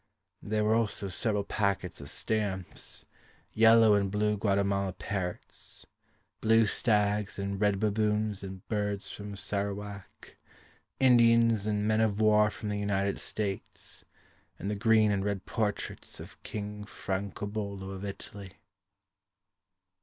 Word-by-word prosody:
There 105 +1 0
were 105 +1 +3
also 110 -3 +1
several 105 +2 0
packets 100 -5 -1
of 70 - -8
stamps, 100 -5 -3 0.5
Yellow 115 -1 +7
and 100 -1 +2
blue 105 +1 +1
Guatemala 100 -2 +1
parrots, 90 -2 -5 0.5
Blue 115 0 +5
stags 105 -1 +1
and 100 0 -3
red 105 -2 +3
baboons 105 -1 +1
and 95 -1 -8
birds 105 -2 -2
from 100 0 -7
Sarawak, 100 0 -5 0.6
Indians 115 -4 +5
and 105 0 0
Men 110 0 +3
of 105 -2 +1
war 105 -1 +5
From 105 0 -6
the 105 0 -1
United 100 -1 0
States, 100 -3 -3 0.5
And 100 - -3
the - - -1
green 110 0 +4
and 100 -1 0
red 100 -2 -2
portraits 105 -4 -3
Of - - -11
King 105 0 -6
Francobello 100 0 -4
Of 95 0 -7
Italy. 100 -1 -7
105 Hz, 125 wpm, -30 LUFS, 100-110 Hz, 0.6 s, Yellow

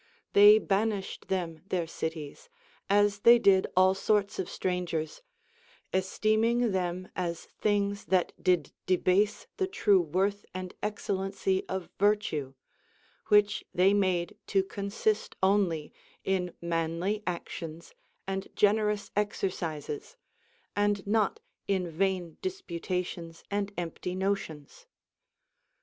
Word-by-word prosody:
They 205 +1 +9
banished 205 -1 -1
them 170 -4 -2
their 175 -2 0
cities, 160 - -6 0.4
as 205 0 +3
they 235 +3 +8
did 195 -4 +4
all 185 0 +6
sorts 200 +1 +1
of 185 - -2
strangers, 175 - -2 0.7
esteeming 215 +5 +2
them 185 -1 -2
as 170 -2 -3
things 200 -1 0
that 185 -2 +1
did 180 -6 +2 0.2
debase 185 +3 +2
the 380 - +1
true 210 - +3
worth 190 +5 0
and 185 -1 -5
excellency 195 -2 -1
of 190 -1 -4
vii'tue, 190 -10 +1 0.7
which 210 0 +4
they 185 +3 +5
made 185 -4 +1
to 195 -2 +2
consist 200 +2 -2
only 190 -6 +2 0.3
in 180 -2 -1
manly 170 +4 -1
actions 170 -2 -5 0.3
and 195 0 -3
generous 210 0 +2
exercises, 180 - -3 0.6
and 205 -1 +1
not 220 - +1 0.3
in 190 -3 0
vain 180 -1 -1
disputations 180 - -4
and 205 0 -1
empty 175 +1 -4
notions. 190 - -3
190 Hz, 105 wpm, -29 LUFS, 175-205 Hz, 0.7 s, They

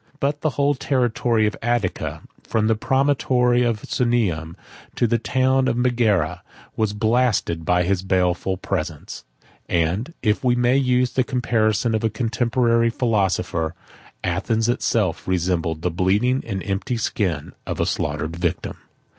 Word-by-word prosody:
8 - - -29
But 145 +1 -1
the 155 - +1
whole 140 0 +3
territory 120 -4 +1
of 105 - -1
Attica, 120 -5 -2 0.2
from 110 -1 0
the 110 - +3
promontory 125 0 +2
of 115 -3 0
Sunium 95 -10 0 0.4
to - - +2
the 115 0 +1
town 130 +2 +2
of 120 -2 0
Megara, 115 -10 +1 0.3
was 110 -2 0
blasted 110 -6 +1
by 90 +1 +3
his 95 +1 0
baleful 95 0 0
presence; 80 -4 -4 0.5
and, 90 - 0
if 105 +1 +1
we 125 -1 +3
may 125 +1 +2
use 125 -2 +2
the 130 - +2
comparison 115 -3 +1
of 110 - 0
a 110 - +2
contemporary 115 0 +1
philosopher, 95 -8 0 0.5
Athens 100 +5 0
itself 115 -6 0
resembled 85 -3 -1
the 90 - 0
bleeding 105 +10 +1
and 95 -4 -3
empty 105 +5 -2
skin 95 -9 -2 0.2
of - - -3
a - - +2
slaughtered 75 +2 -2
victim. 85 -1 -2
110 Hz, 145 wpm, -22 LUFS, 90-125 Hz, 0.5 s, whole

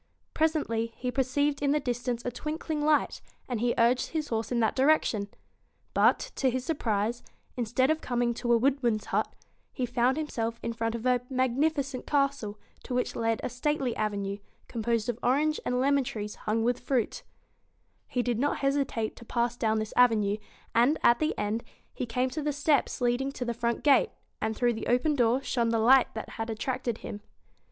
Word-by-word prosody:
Presently 290 -8 0
he 250 0 -2
perceived 280 +2 0
in 285 0 +2
the 300 - +2
distance 245 -2 -3
a 245 - -1
twinkling 305 +3 -3
light, 300 0 +2 0.3
and 245 -4 -2
he 240 +1 +1
urged 240 +2 +3
his 310 -2 -3
horse 225 0 -2
in 240 - +1
that 220 -2 +2
direction. 260 -7 +2 0.7
But, - - +3
to 265 - +2
his 255 +1 -2
surprise, 235 -6 -1 0.3
instead 250 +4 +1
of 315 +1 -1
coming 240 -1 0
to 240 +1 -2
a 235 - +6
wood 270 +3 +2
man's 225 -4 0
hut, - - 0 0.4
he 255 - -2
found 245 +3 +1
himself 230 -7 -2
in 230 - -2
front 225 0 -2
of 230 +1 -6
a 250 -1 +4
magnifi 270 +4 +1
cent 260 -2 -7
castle, 275 -7 0 0.2
to 250 - -5
which 250 - -1
led 225 -1 0
a - - -1
stately 260 0 -1
avenue, 200 -1 -2 0.3
com 235 - -5
posed 230 -1 0
of 240 -1 -2
orange 295 +5 +2
and 250 0 +1
lemon 280 +1 +3
trees 210 -3 -5
hung 220 +1 -1
with 245 +1 +1
fruit 250 -2 -1 0.9
He 245 - -1
did 240 -2 -1
not 290 +3 +1
hesitate 275 -5 0
to 235 - -12
pass 240 +1 0
down 220 -2 +1
this 215 0 -3
avenue, 215 -5 +4 0.4
and, 245 +7 +4
at 235 0 +5
the 310 - 0
end, 215 +3 -1 0.3
he 250 - -4
came 250 +3 0
to 310 - -3
the 295 0 -1
steps 285 -2 +1
leading 245 +3 +1
to 250 - -4
the 235 - -1
front 235 0 -2
gate, 295 - +5 0.3
and 220 0 -1
through 240 0 +2
the 220 - -5
open 250 +6 +2
door 245 +1 +2
shone 235 -4 0
the 230 - +2
light 250 +3 +5
that 220 - -5
had 225 - -3
attracted 240 +1 -2
him. 205 - -6
245 Hz, 195 wpm, -28 LUFS, 230-275 Hz, 0.9 s, a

